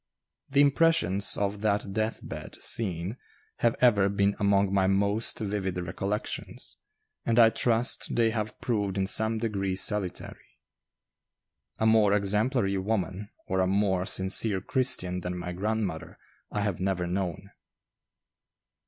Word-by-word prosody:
The 140 +1 +3
impressions 145 - +3
of 100 0 -2
that 105 -2 0
death 110 +1 -2
bed - - -8
scene 95 0 -1 0.4
have 120 -1 +1
ever 105 -6 +4
been 100 0 +1
among 100 -1 +2
my 95 -1 +3
most 100 +3 0
vivid 100 -3 -2
recollections, 100 +4 -4 0.4
and 115 0 0
I 115 -1 +7
trust 120 +1 0
they 115 -1 +3
have 110 -1 -4
proved 100 -5 -1
in 95 - +1
some 110 +3 +3
degree 100 -4 -2
salutary. 95 -1 -3 1.2
A 110 - 0
more 110 -2 +4
exemplary 105 0 +1
woman, 100 0 -3 0.2
or 95 - -1
a 95 - +2
more 95 -1 +1
sincere 95 +1 +2
Christian 90 -6 0
than 90 0 -5
my 90 0 -5
grandmother, 100 -2 -3 0.3
I 105 - -2
have 100 -3 -2
never 95 -1 -1
known. 95 +1 -4
100 Hz, 130 wpm, -27 LUFS, 95-110 Hz, 1.2 s, I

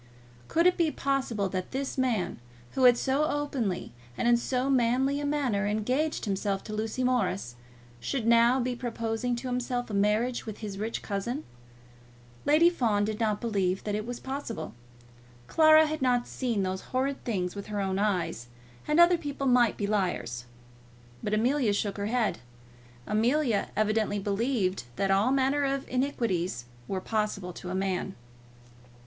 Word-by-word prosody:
Could 335 +1 +2
it 360 - +5
be 335 -2 +3
possible 265 -8 -1
that 185 -1 -3
this 270 +1 -3
man, 245 -8 0 0.3
who 260 - +2
had 245 -1 +7
so 270 +5 +1
openly 285 -10 -2 0.3
and - - 0
in 240 - +6
so 250 +2 -1
manly 265 +2 +2
a 290 - -2
manner 255 -9 0
engaged 250 +10 0
himself 195 -1 -1
to 215 - -7
Lucy 220 +4 -2
Morris, 195 - 0 0.4
should 220 - -2
now 235 +2 +5
be 250 0 -1
proposing 235 0 -2
to 240 +2 -5
himself 245 -1 -2
a - - -5
marriage 210 +5 +1
with 215 - -5
his 205 -3 -6
rich 220 +2 -3
cousin? 235 +8 -3 1.0
Lady 305 +4 +6
Fawn 225 -12 +2
did 215 +1 -3
not 215 -2 +1
believe 195 -5 0
that 210 - -2
it 215 +2 -2
was 245 0 -5
possible. 265 -3 -5 0.7
Clara 315 - +6
had 310 -1 -3
not 245 -2 +2
seen 235 -6 -1
those 185 0 -2
horrid 270 +2 -2
things 185 -6 -2
with 200 - -6
her 210 -1 -3
own 195 -1 -1
eyes, 185 - -1 0.4
and 300 +2 +2
other 345 0 +6
people 285 -3 -4
might 245 -3 +4
be 205 - -1
liars. 175 - -1 0.8
But 210 - 0
Amelia 240 0 +2
shook 205 0 -1
her 200 0 -2
head. 225 - 0 0.7
Amelia 235 +1 +1
evidently 215 -1 +1
believed 200 - -1
that 195 +5 0
all 200 +6 +3
manner 275 +2 +2
of 275 0 -1
iniquities 225 - -1 0.2
were 190 -1 -2
possible 210 -4 -2
to 180 +2 -6
man. 190 0 -2
230 Hz, 160 wpm, -28 LUFS, 200-265 Hz, 1.0 s, had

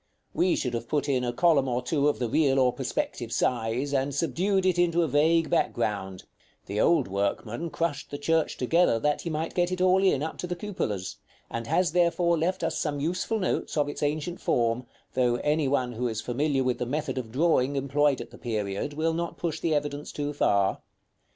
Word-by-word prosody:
We 180 - +2
should 125 -2 -2
have 115 0 -3
put 145 +1 0
in 130 -3 +1
a 120 - 0
column 140 0 +3
or 125 0 -1
two 145 +2 +1
of 150 - +1
the 120 - -1
real 135 +2 +2
or 130 -2 +3
perspective 120 -2 -3
size, 120 +4 0
and 135 0 0
subdued 185 +5 +1
it 180 -2 +2
into 175 -1 +3
a - - +1
vague 160 +2 +2
background: 100 -5 -1 0.4
the 105 +2 -1
old 160 -6 +3
workman 105 - -2
crushed 165 -3 -2
the 145 - -5
church 160 +2 0
together 160 0 +3
that 150 +5 0
he 170 - -4
might 155 +1 -3
get 175 0 +1
it 185 - -2
all 185 +1 +4
in, 150 -7 +3
up 160 - -5
to 180 - -3
the 175 - -3
cupolas; 170 - -4 0.3
and 115 0 -4
has, 180 +4 +2
therefore, 170 0 +2
left 180 +4 -1
us - - -1
some 145 -3 -2
useful 180 +8 -1
notes 185 -5 -2
of 145 -1 +2
its 145 - -6
ancient 155 +4 -2
form, 120 +1 0 0.3
though 125 -2 +2
any 150 +3 +1
one 130 -2 0
who 120 +1 -2
is 110 -2 -3
familiar 135 +4 0
with 125 -1 0
the 125 - -2
method 145 0 -2
of 115 -3 -7
drawing 140 -1 +2
employed 140 +1 +2
at - - -8
the - - -13
period 105 +2 -3
will 160 +2 0
not 170 +1 -3
push 170 -3 -3
the 160 -2 +1
evidence 145 0 -3
too 145 0 -3
far. 100 -8 +2
145 Hz, 210 wpm, -27 LUFS, 125-165 Hz, 0.4 s, all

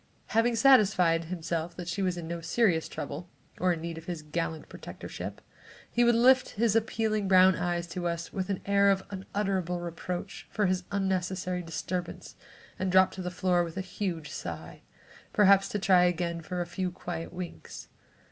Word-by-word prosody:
Having 230 +1 +3
satisfied 195 -10 +5
himself 170 -1 -3
that 175 -1 -7
she 175 +3 -2
was 180 -2 0
in 165 -2 -5
no 170 0 -4
serious 175 -3 +2
trouble 175 0 -6 0.3
or 185 0 +3
in 165 -2 -2
need 165 0 -5
of 165 - -15
his 170 -3 -5
gallant 160 +1 -3
protectorship, - - -8 0.5
he 240 - +3
would 240 0 +5
lift 255 +2 +5
his 225 -1 +2
appealing 220 -2 0
brown 185 -1 +6
eyes 175 0 -1
to 175 +1 -3
us 170 0 -4
with 190 0 -3
an 195 - -2
air 200 0 +4
of 190 -1 +2
unutterable 190 -2 -2
reproach 175 +1 -5
for 210 - 0
his 185 -1 0
unnecessary 185 -2 -1
disturbance, 175 +1 -5 0.4
and 190 0 0
drop 185 0 +6
to 190 - -7
the 180 - -3
floor 180 0 +1
with 170 +1 -7
a - - 0
huge 180 -4 -4
sigh, 80 -1 -7 0.5
perhaps 200 -1 +5
to - - -1
try 185 -2 +5
again 170 -1 -1
for 180 +2 -4
a - - -1
few 180 +1 -3
quiet 175 -2 -6
winks. 180 -1 -8
180 Hz, 175 wpm, -29 LUFS, 170-195 Hz, 0.5 s, brown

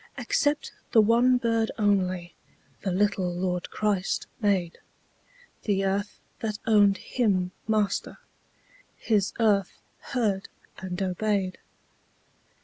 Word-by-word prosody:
Except 295 -12 0 0.2
the 230 - +7
one 235 +4 +5
bird 230 -2 +1
only 185 -5 +1 0.5
The 190 - -1
little 190 -1 +1
Lord 180 0 -2
Christ 205 -3 -1 0.2
made; 190 -5 +1 0.9
The 195 -2 +1
earth 200 +2 -2 0.2
that 215 -2 -3
owned 205 -3 +5
Him 190 -7 0 0.2
Master, 215 -2 0 0.8
His 210 -3 +1
earth 205 -4 +2 0.2
heard 210 -7 -1 0.3
and 185 -1 -5
obeyed. 190 0 -1
205 Hz, 100 wpm, -27 LUFS, 185-220 Hz, 0.9 s, the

